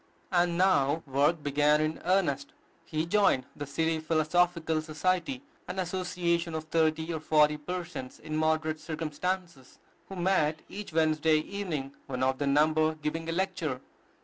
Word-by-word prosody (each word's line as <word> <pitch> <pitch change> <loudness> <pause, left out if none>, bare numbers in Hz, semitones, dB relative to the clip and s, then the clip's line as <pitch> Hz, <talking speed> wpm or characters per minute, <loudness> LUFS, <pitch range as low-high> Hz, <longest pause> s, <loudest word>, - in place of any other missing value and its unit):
And 175 -1 +2
now 165 -5 +3
work 145 +3 +1
began 145 +1 +3
in 155 +1 -1
earnest. 155 -8 +1 0.3
He 155 +1 -2
joined 170 -8 +3
the 145 - -6
City 160 +3 0
Philosophical 160 +1 +1
Society, 185 - -1 0.2
an 180 - -5
association 175 -2 -1
of 160 - -3
thirty 160 +1 +1
or 160 - -2
forty 150 -1 +4
persons 170 -4 -6
in 155 0 -5
moderate 155 0 +1
circumstances, 160 -1 -4 0.3
who 195 - -6
met 175 -4 +1
each 205 -2 -7
Wednesday 155 -1 +3
evening, 155 -6 -4
one 130 -2 -2
of 130 0 +1
their 145 - 0
number 155 +2 +3
giving 160 +2 -3
a - - +1
lecture. 165 -6 -1
160 Hz, 145 wpm, -29 LUFS, 150-175 Hz, 0.3 s, forty